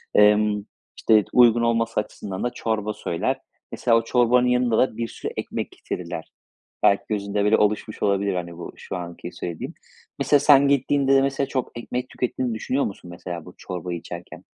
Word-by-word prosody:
Emm, 105 Hz, 0 st, +4 dB, 0.3 s
işte, 110 Hz, -3 st, +4 dB
uygun 120 Hz, -1 st, +6 dB
olması 115 Hz, -1 st, +1 dB
açısından 100 Hz, -2 st, -5 dB
da 120 Hz, -, +1 dB
çorba 110 Hz, -3 st, -2 dB
söyler. 85 Hz, -5 st, -2 dB, 0.3 s
Mesela 115 Hz, -1 st, +3 dB
o 115 Hz, -, +1 dB
çorbanın 125 Hz, +1 st, +3 dB
yanında 125 Hz, -2 st, +2 dB
da 130 Hz, -4 st, +2 dB
bir 115 Hz, -, -2 dB
sürü -, -, -6 dB
ekmek -, -, -4 dB
getirirler. -, -, -6 dB, 0.6 s
Belki 100 Hz, 0 st, +4 dB
gözünde, 100 Hz, -1 st, -1 dB
böyle, 105 Hz, +2 st, +4 dB
oluşmuş 105 Hz, +1 st, 0 dB
olabilir, 100 Hz, -1 st, +1 dB
hani, 85 Hz, -1 st, -5 dB
bu 85 Hz, -, -7 dB
şu -, -, -7 dB
anki 85 Hz, 0 st, -7 dB
söylediğim. 85 Hz, -2 st, -6 dB, 0.5 s
Mesela 145 Hz, -, +4 dB
sen 140 Hz, -1 st, +6 dB
gittiğinde 140 Hz, 0 st, +3 dB
de, 135 Hz, -, +6 dB
mesela, 135 Hz, 0 st, 0 dB
çok 130 Hz, -2 st, -2 dB
ekmek 125 Hz, +1 st, -4 dB
tükettiğini 125 Hz, -1 st, -2 dB
düşünüyor 130 Hz, +5 st, -1 dB
musun, 90 Hz, -3 st, -7 dB
mesela 85 Hz, -1 st, -7 dB
bu 90 Hz, -, -12 dB
çorbayı 90 Hz, -1 st, -5 dB
içerken? 85 Hz, +1 st, -9 dB
110 Hz, 170 wpm, -24 LUFS, 100-125 Hz, 0.6 s, uygun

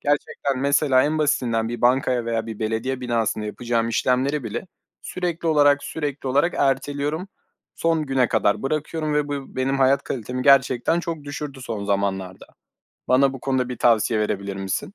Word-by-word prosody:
Gerçekten 145 Hz, -2 st, -1 dB
mesela 140 Hz, -1 st, +3 dB
en 155 Hz, +2 st, 0 dB
basitinden 120 Hz, -7 st, +1 dB
bir 120 Hz, +1 st, -5 dB
bankaya 125 Hz, -1 st, +2 dB
veya 115 Hz, -1 st, -2 dB
bir 110 Hz, -2 st, -7 dB
belediye 115 Hz, +4 st, -2 dB
binasında 115 Hz, -3 st, -1 dB
yapacağım 115 Hz, +1 st, -1 dB
işlemleri 130 Hz, +4 st, 0 dB
bile 110 Hz, -, -5 dB, 0.4 s
sürekli 175 Hz, -2 st, -3 dB
olarak, 145 Hz, -2 st, +4 dB
sürekli 145 Hz, -3 st, -4 dB
olarak 145 Hz, +6 st, +2 dB
erteliyorum. 145 Hz, +5 st, 0 dB, 0.5 s
Son 165 Hz, -2 st, 0 dB
güne 130 Hz, -3 st, +2 dB
kadar 100 Hz, -, +1 dB
bırakıyorum 155 Hz, +2 st, -2 dB
ve 150 Hz, -1 st, 0 dB
bu 140 Hz, -2 st, -6 dB
benim 135 Hz, +1 st, 0 dB
hayat 135 Hz, +1 st, +3 dB
kalitemi 125 Hz, +1 st, -4 dB
gerçekten 140 Hz, +3 st, +4 dB
çok 165 Hz, -4 st, -5 dB
düşürdü 145 Hz, -1 st, -6 dB
son 110 Hz, -5 st, -4 dB
zamanlarda. 95 Hz, -2 st, -2 dB, 0.6 s
Bana 135 Hz, +1 st, +4 dB
bu 135 Hz, -, -8 dB
konuda 130 Hz, -2 st, 0 dB
bir 125 Hz, -, -5 dB
tavsiye 115 Hz, -1 st, +3 dB
verebilir 100 Hz, -2 st, -2 dB
misin? 95 Hz, -, -4 dB
130 Hz, 155 wpm, -23 LUFS, 115-145 Hz, 0.6 s, olarak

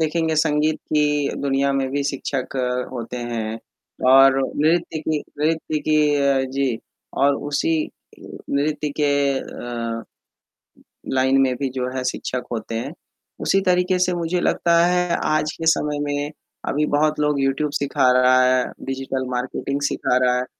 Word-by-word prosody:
देखेंगे 160 Hz, 0 st, 0 dB
संगीत 150 Hz, +1 st, +2 dB
की 150 Hz, -1 st, +2 dB
दुनिया 140 Hz, 0 st, +1 dB
में 135 Hz, -1 st, 0 dB
भी 140 Hz, +1 st, -1 dB
शिक्षक 135 Hz, -1 st, -3 dB, 0.4 s
होते 120 Hz, -1 st, -5 dB
हैं, 115 Hz, -2 st, -4 dB, 0.5 s
और 135 Hz, 0 st, +7 dB, 0.2 s
नृत्य 165 Hz, +1 st, +1 dB
की 155 Hz, 0 st, -1 dB, 0.2 s
नृत्य 155 Hz, 0 st, 0 dB
की 155 Hz, +1 st, +1 dB, 0.2 s
अ, 140 Hz, -1 st, +2 dB
जी 130 Hz, -3 st, -1 dB, 0.4 s
और 140 Hz, 0 st, +5 dB
उसी 145 Hz, +3 st, +1 dB, 0.8 s
नृत्य 150 Hz, +1 st, 0 dB
के 145 Hz, -1 st, +3 dB, 0.3 s
अ, 115 Hz, -1 st, -5 dB, 1.1 s
लाइन 130 Hz, +1 st, +3 dB
में 130 Hz, -1 st, +2 dB
भी 140 Hz, -, 0 dB
जो 125 Hz, -1 st, -3 dB
है 130 Hz, -, -2 dB
शिक्षक 125 Hz, 0 st, -3 dB
होते 115 Hz, 0 st, -4 dB
हैं, 125 Hz, +7 st, -3 dB, 0.5 s
उसी 195 Hz, -, +2 dB
तरीके 180 Hz, 0 st, +2 dB
से 180 Hz, 0 st, +2 dB
मुझे 175 Hz, +1 st, -1 dB
लगता 170 Hz, -1 st, +2 dB
है 180 Hz, -1 st, +1 dB
आज 155 Hz, 0 st, +1 dB
के 165 Hz, -, -6 dB
समय 150 Hz, 0 st, -2 dB
में 145 Hz, 0 st, -2 dB, 0.4 s
अभी 150 Hz, +2 st, +1 dB
बहुत 155 Hz, +1 st, +1 dB
लोग 150 Hz, -1 st, +1 dB
यूट्यूब 135 Hz, +2 st, 0 dB
सीखा 140 Hz, -2 st, +2 dB
रहा 130 Hz, 0 st, +5 dB
है, 130 Hz, 0 st, +3 dB, 0.2 s
डिजिटल 135 Hz, 0 st, -3 dB
मार्केटिंग 130 Hz, +2 st, -3 dB
सिखा 125 Hz, -, 0 dB
रहा 125 Hz, 0 st, +3 dB
है। 125 Hz, -, -1 dB
140 Hz, 150 wpm, -22 LUFS, 130-155 Hz, 1.1 s, और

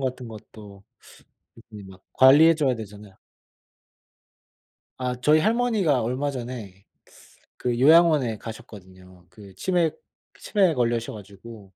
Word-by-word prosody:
같은 130 Hz, -2 st, -5 dB
것도 105 Hz, -2 st, -14 dB, 0.9 s
일일이 105 Hz, -2 st, -11 dB
막 95 Hz, -1 st, -16 dB
관리해 150 Hz, +5 st, +6 dB
줘야 140 Hz, -5 st, 0 dB
되잖아요. 105 Hz, -2 st, -12 dB, 1.8 s
아 125 Hz, -1 st, -3 dB
저희 155 Hz, +4 st, +3 dB
할머니가 215 Hz, -, 0 dB
얼마 130 Hz, +5 st, -2 dB
전에 115 Hz, -7 st, -9 dB, 0.7 s
그 120 Hz, -1 st, -3 dB
요양원에 150 Hz, -5 st, +4 dB
가셨거든요. 95 Hz, -5 st, -13 dB
그 95 Hz, 0 st, -15 dB
치매 175 Hz, -4 st, 0 dB, 0.5 s
치매에 190 Hz, -6 st, +1 dB
걸리셔 120 Hz, -2 st, -2 dB
가지고. 105 Hz, +1 st, -13 dB
120 Hz, 255 characters per minute, -23 LUFS, 105-150 Hz, 1.8 s, 관리해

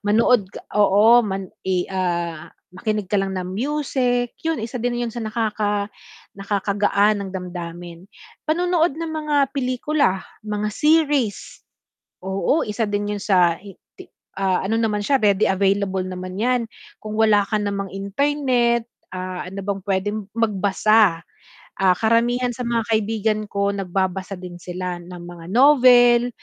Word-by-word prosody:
Manood 210 Hz, 0 st, +3 dB, 0.2 s
oo 210 Hz, +3 st, +5 dB
man 195 Hz, -4 st, -4 dB, 0.2 s
eh, 180 Hz, -1 st, +1 dB
ah, 170 Hz, -4 st, -2 dB, 0.2 s
makinig 210 Hz, 0 st, -3 dB
ka 205 Hz, -, +3 dB
lang 195 Hz, -1 st, -3 dB
ng 185 Hz, -, -3 dB
music, 250 Hz, 0 st, -1 dB
yun 325 Hz, 0 st, -1 dB
isa 235 Hz, +1 st, -5 dB
din 240 Hz, +1 st, -1 dB
yun 230 Hz, -, -5 dB
sa 240 Hz, -, -5 dB
nakaka 215 Hz, -2 st, -2 dB, 0.4 s
nakaka-gaan 200 Hz, +1 st, +1 dB
ng 195 Hz, -, -5 dB
damdamin. 175 Hz, 0 st, -8 dB, 0.4 s
Panonood 340 Hz, -1 st, +1 dB
ng 330 Hz, -1 st, -4 dB
mga 305 Hz, -1 st, -1 dB, 0.2 s
pelikula, 255 Hz, -6 st, 0 dB, 0.2 s
mga 210 Hz, 0 st, -3 dB
series. 295 Hz, -5 st, +1 dB, 0.6 s
Oo 195 Hz, +11 st, 0 dB
isa 215 Hz, +1 st, -2 dB
din 205 Hz, 0 st, -2 dB
yun 205 Hz, -, -4 dB
sa 180 Hz, -5 st, +2 dB
i 195 Hz, -1 st, -12 dB, 0.2 s
ti -, -, -11 dB, 0.3 s
ano 195 Hz, +3 st, +1 dB
naman 210 Hz, -2 st, 0 dB
siya 275 Hz, +4 st, +2 dB
ready 205 Hz, -1 st, +3 dB
available 195 Hz, 0 st, +1 dB
naman 185 Hz, +1 st, -6 dB
yan. 250 Hz, +2 st, +2 dB, 0.4 s
Kung 215 Hz, +1 st, -5 dB
wala 210 Hz, -2 st, +4 dB
ka 215 Hz, +2 st, -2 dB
namang 200 Hz, -1 st, -2 dB
internet, 240 Hz, +2 st, 0 dB, 0.3 s
ah, 185 Hz, 0 st, -5 dB
ano 195 Hz, +2 st, -6 dB
bang 200 Hz, 0 st, -2 dB
pwedeng 200 Hz, +2 st, -1 dB, 0.2 s
magbasa. 210 Hz, -3 st, +2 dB, 0.6 s
Ah, 190 Hz, -1 st, +4 dB
karamihan 240 Hz, +2 st, +2 dB
sa 250 Hz, -, -6 dB
mga 235 Hz, -1 st, 0 dB
kaibigan 215 Hz, 0 st, 0 dB
ko 200 Hz, 0 st, 0 dB
nagbabasa 190 Hz, 0 st, -2 dB
din 180 Hz, -1 st, -9 dB
sila 180 Hz, 0 st, -5 dB
ng 175 Hz, 0 st, -10 dB
mga 175 Hz, -1 st, -10 dB
novel, 245 Hz, -1 st, +6 dB
205 Hz, 140 wpm, -21 LUFS, 190-240 Hz, 0.6 s, novel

